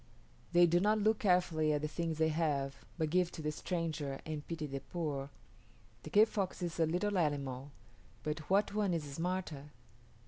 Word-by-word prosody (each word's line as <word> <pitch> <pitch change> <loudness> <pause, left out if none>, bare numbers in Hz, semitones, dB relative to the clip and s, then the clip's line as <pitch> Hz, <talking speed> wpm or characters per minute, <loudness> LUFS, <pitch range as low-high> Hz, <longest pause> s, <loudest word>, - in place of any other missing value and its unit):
They 175 0 +7
do 175 +1 +4
not 210 +3 +3
look 215 +1 +2
carefully 175 -5 +3
at 150 0 -1
the - - +1
things 165 0 -2
they 160 0 +3
have, 145 -4 0 0.2
but 160 -2 0
give 180 0 +2
to - - -6
the 150 - 0
stranger 155 -4 -3
and 155 -2 -4
pity 165 -2 -3
the 135 -1 -4
poor. 140 -3 -3 0.7
The - - -8
kit 215 +2 +6
fox 195 -4 -2
is 170 -1 -3
a 165 - +4
little 185 +4 +1
animal, 140 -4 -1 0.5
but 155 +1 -2
what 200 +1 +3
one 205 -4 +1
is 160 - -1
smarter? 160 0 -3
165 Hz, 180 wpm, -34 LUFS, 150-180 Hz, 0.7 s, They